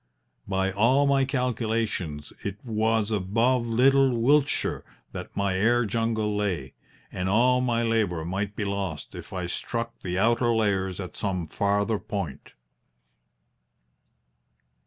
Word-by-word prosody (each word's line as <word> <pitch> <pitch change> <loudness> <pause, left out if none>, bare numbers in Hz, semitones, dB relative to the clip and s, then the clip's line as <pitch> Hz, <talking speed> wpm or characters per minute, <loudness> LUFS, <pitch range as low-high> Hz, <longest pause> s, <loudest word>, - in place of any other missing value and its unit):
By 95 0 0
all 120 +8 +3
my 135 -1 +3
calculations 115 - -2
it 100 0 -4
was 110 -1 +1
above 115 +5 +1
little 130 +2 +4
Wiltshire 145 +4 +2 0.3
that - - -8
my 100 -2 +1
air 120 +5 +3
jungle 110 -1 0
lay, 90 -10 -2 0.4
and 90 +1 -2
all 125 +5 +4
my 120 -2 +1
labour 105 -8 0
might 100 +3 -3
be 105 - -2
lost 100 -5 -4
if - - -9
I 90 -2 -3
struck 115 +6 -4
the 90 -1 -3
outer 120 +3 +3
layers 95 -4 0
at 90 -2 -6
some 95 -4 -2
farther 100 +5 0
point. 85 -9 -5
110 Hz, 125 wpm, -26 LUFS, 95-120 Hz, 0.4 s, little